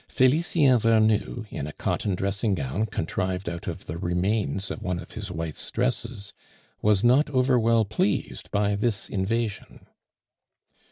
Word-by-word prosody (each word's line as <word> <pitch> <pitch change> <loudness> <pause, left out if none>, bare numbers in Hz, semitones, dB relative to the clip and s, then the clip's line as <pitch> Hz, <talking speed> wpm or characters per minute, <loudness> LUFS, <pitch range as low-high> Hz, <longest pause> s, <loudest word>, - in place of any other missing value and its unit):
Felicien 135 -1 +3
Vernou, 110 +1 +2
in 70 - -4
a - - -5
cotton 100 -3 -1
dressing 100 +2 0
gown 85 +9 -2
contrived 95 +1 -2
out 85 -1 -5
of - - -5
the 80 +2 -5
remains 95 +3 -1
of - - -6
one 90 -4 -2
of 85 - -9
his 105 -3 -5
wife's 80 -3 -4
dresses, 115 -3 -2 0.5
was 105 -2 +3
not 130 +5 +4
over 130 -2 +3
well 115 -1 +3
pleased 100 -1 -1
by 100 0 +1
this 105 +1 -1
invasion. 105 +2 -2
105 Hz, 145 wpm, -26 LUFS, 95-115 Hz, 0.5 s, not